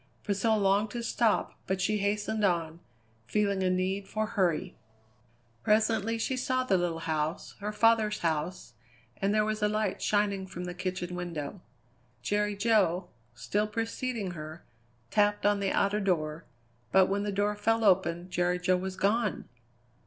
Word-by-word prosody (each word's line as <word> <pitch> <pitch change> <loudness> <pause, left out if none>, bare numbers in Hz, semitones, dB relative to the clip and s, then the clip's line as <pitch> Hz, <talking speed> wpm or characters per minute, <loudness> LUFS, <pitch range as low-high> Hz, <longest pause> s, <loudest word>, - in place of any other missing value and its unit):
Priscilla 215 +2 +1
longed 200 +1 +2
to 235 +2 -5
stop, 230 -2 +1
but 190 0 -1
she 210 +2 +1
hastened 210 +1 -1
on, 170 -4 0 0.5
feeling 200 - +1
a 185 - +2
need 190 +2 -1
for 215 0 -1
hurry. 185 -3 0 0.9
Presently 220 - +2
she 260 +3 -1
saw 255 0 0
the 210 -7 +2
little 175 -2 -1
house, 155 -1 -2
her 210 +1 -3
father's 220 -1 +3
house, 160 -3 -2 0.4
and 195 +1 0
there 215 0 +3
was 215 0 -2
a 210 - +3
light 215 0 -1
shining 200 -2 +1
from 180 -1 -7
the 180 0 -4
kitchen 180 -1 -4
window. 175 -1 -5 0.6
Jerry 210 +5 0
Jo, 195 -5 +2 0.3
still 205 +11 -1
preceding 225 -1 -3
her, 155 0 -8 0.5
tapped 205 -1 +2
on 205 0 +3
the 195 -1 0
outer 200 +1 +2
door, 165 -5 -1 0.5
but 190 -1 +6
when 200 +2 -1
the 205 0 -2
door 205 +1 0
fell 225 +2 +1
open 180 -3 +2
Jerry 180 0 +1
Jo 180 +1 +2
was 185 +1 -4
gone! 210 +2 0
200 Hz, 155 wpm, -29 LUFS, 180-210 Hz, 0.9 s, but